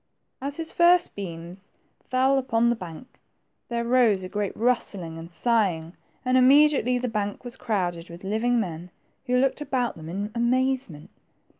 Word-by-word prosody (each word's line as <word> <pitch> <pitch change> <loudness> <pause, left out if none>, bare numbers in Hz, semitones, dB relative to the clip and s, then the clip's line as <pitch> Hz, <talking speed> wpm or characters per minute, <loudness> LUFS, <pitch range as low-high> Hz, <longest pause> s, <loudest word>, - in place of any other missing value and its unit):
As 280 +1 -3
his 325 -1 -5
first 350 +1 +4
beams 180 0 -8 0.4
fell 265 +1 +3
upon 235 -2 +2
the - - +1
bank, 185 +4 -11 0.5
there 235 -1 -2
rose 235 -6 +3
a 185 - -6
great 205 -1 -3
rustling 200 -8 -1
and 165 +1 -9
sighing, 180 -4 0 0.3
and 255 0 +4
immediately 270 -1 +5
the 250 0 -2
bank 210 -2 -3
was 245 +1 -7
crowded 180 -8 -2
with 170 +2 -11
living 225 +5 +1
men, 175 -4 -4 0.4
who 250 0 +2
looked 270 +3 +1
about 255 -4 -1
them 160 0 -9
in 200 +4 -4
amazement. 245 - -1
230 Hz, 155 wpm, -25 LUFS, 185-255 Hz, 0.5 s, immediately